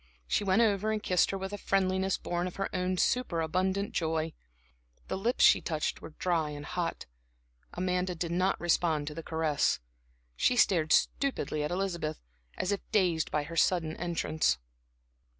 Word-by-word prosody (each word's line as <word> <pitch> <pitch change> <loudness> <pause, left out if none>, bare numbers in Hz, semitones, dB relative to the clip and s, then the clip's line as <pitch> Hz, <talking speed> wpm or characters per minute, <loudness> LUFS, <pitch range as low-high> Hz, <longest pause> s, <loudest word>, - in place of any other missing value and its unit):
She 65 - +1
went 195 +4 +4
over 215 0 +1
and 215 -1 -2
kissed 180 -2 +3
her 195 - -2
with 190 +1 -5
a 205 - -4
friendliness 190 0 +1
born 175 +1 -2
of 180 - -7
her 195 0 -3
own 185 0 0
superabundant 190 -2 0
joy. 160 -1 -1 0.8
The - - -1
lips 230 +7 +1
she - - +6
touched 155 -3 -2
were 150 - -10
dry 165 -4 0
and 145 0 -7
hot. 175 -2 -3 0.7
Amanda 180 0 -1
did 170 0 -3
not 185 +2 +1
respond 165 -3 +1
to 150 - -5
the 165 - -6
caress. 160 -3 0 0.6
She 250 - +2
stared 170 -9 +3
stupidly 155 - +1
at 150 - -1
Elizabeth, 175 -4 -2 0.4
as 185 - -1
if 200 - 0
half - - -35
dazed 175 -6 +2
by 150 0 0
her 165 +3 -8
sudden 165 -1 +2
entrance. 160 - 0
180 Hz, 170 wpm, -30 LUFS, 160-190 Hz, 0.8 s, she